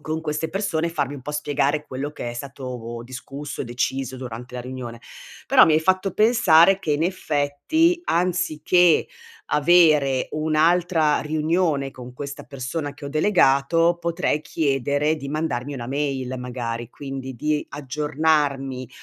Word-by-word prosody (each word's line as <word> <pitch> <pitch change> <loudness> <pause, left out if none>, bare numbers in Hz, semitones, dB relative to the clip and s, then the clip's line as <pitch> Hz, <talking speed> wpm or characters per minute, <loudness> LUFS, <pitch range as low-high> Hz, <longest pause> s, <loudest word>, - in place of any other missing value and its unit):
con 155 +1 -3
queste 155 +1 -2
persone, 170 -4 -1
farmi 145 -4 -2
un 140 - -8
po' 140 +4 -6
spiegare 150 0 0
quello 135 +3 -4
che 120 -5 -6
è - - -7
stato 120 -2 -7
discusso, 135 +4 -7
deciso 130 +2 -2
durante 125 -1 -8
la 125 - -4
riunione. 125 -2 -7 0.5
Però - - +7
mi 155 - +4
hai 155 - +3
fatto 185 +2 +1
pensare 195 -5 +5
che 155 -6 -1
in 145 - 0
effetti, 180 - +1
anziché 175 - +2 0.5
avere 150 -4 +4
un'altra 160 +1 +2
riunione 155 -2 0
con 125 -1 -10
questa 140 +2 -7
persona 140 +2 -5
che 145 - -12
ho - - -4
delegato, 165 0 +3
potrei 170 -2 0
chiedere 145 +1 0
di 140 -2 -7
mandarmi 145 -3 -2
una 120 -2 -6
mail 135 -2 -2
magari, 120 -2 -5
quindi 135 0 -7
di 150 +4 -1
aggiornarmi, 145 -2 -1
145 Hz, 140 wpm, -23 LUFS, 130-160 Hz, 0.5 s, Però